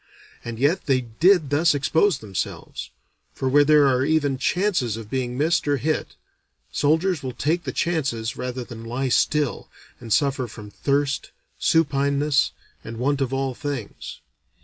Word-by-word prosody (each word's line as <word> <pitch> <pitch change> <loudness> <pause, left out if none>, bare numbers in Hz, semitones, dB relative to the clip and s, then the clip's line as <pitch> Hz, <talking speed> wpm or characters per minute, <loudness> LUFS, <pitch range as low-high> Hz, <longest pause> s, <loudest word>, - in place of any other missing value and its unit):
And 115 -1 -6
yet 145 +9 +1
they 130 -2 +3
did 150 - +3
thus 155 +2 +3
expose 160 +7 +2
themselves; 100 -4 -5 0.4
for 130 - -3
where 145 +3 +5
there 150 0 +5
are 130 -1 +3
even 145 -3 +1
chances 175 - 0
of 110 -2 -9
being 125 -2 -2
missed 160 +2 +1
or 145 -1 +2
hit, 155 +4 -2 0.6
soldiers 160 +3 +1
will 130 -2 -5
take 165 +4 0
the - - -2
chances 135 -10 -1
rather 125 0 -4
than 115 -2 -10
lie 125 +3 -2
still 150 +2 +1 0.3
and 115 -2 -9
suffer 135 +1 +2
from 105 -2 -11
thirst, 140 +4 -1 0.3
supineness, 140 - +2 0.3
and 115 +1 -7
want 140 +3 0
of 135 -2 0
all 135 -1 -1
things. 140 -5 -6
140 Hz, 150 wpm, -23 LUFS, 125-150 Hz, 0.6 s, where